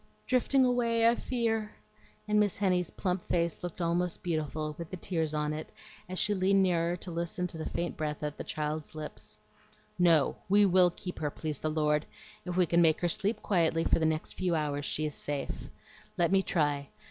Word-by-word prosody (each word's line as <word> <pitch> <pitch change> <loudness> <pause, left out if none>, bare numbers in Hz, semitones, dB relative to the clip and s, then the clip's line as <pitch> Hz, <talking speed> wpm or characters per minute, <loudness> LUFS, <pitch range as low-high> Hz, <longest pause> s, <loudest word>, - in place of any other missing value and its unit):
"Drifting 260 +1 +3
away, 235 -2 +2
I 230 - +6
fear;" 225 -4 -1 0.5
and 210 0 +3
Miss 205 -2 +2
Henny's 180 -4 +1
plump 180 -1 -2
face 170 -2 0
looked 175 0 -5
almost 175 +1 0
beautiful, 155 -2 -2
with 170 -1 -6
the 185 - -6
tears 160 -4 -1
on 150 0 0
it, 155 +1 -6 0.4
as 185 - -3
she 210 - +5
leaned 195 0 +3
nearer 170 -2 +1
to 180 - -6
listen 170 +2 -2
to 170 - -6
the 155 - -3
faint 175 - -3
breath 150 -1 -3
at 150 0 -3
the - - -3
child's 155 +1 -4
lips. 155 -1 -7 0.6
"No; 165 -5 +4
we 205 +1 +6
will 185 -1 +5
keep 180 +1 -8
her, 150 -2 -1
please 150 -1 -4
the 155 - -1
Lord! 150 -1 +1 0.4
If 180 0 -3
we 180 - +5
can 170 +1 +3
make 160 -2 +4
her 175 - +2
sleep 205 +6 0
quietly 165 -4 +2
for - - +2
the 160 - +1
next 155 0 -2
few 180 -2 0
hours 145 -2 -1
she 155 - 0
is 150 - -3
safe. 145 -1 -4 0.5
Let 170 0 +2
me 195 0 +5
try. 145 -6 0
170 Hz, 200 wpm, -30 LUFS, 155-190 Hz, 0.6 s, I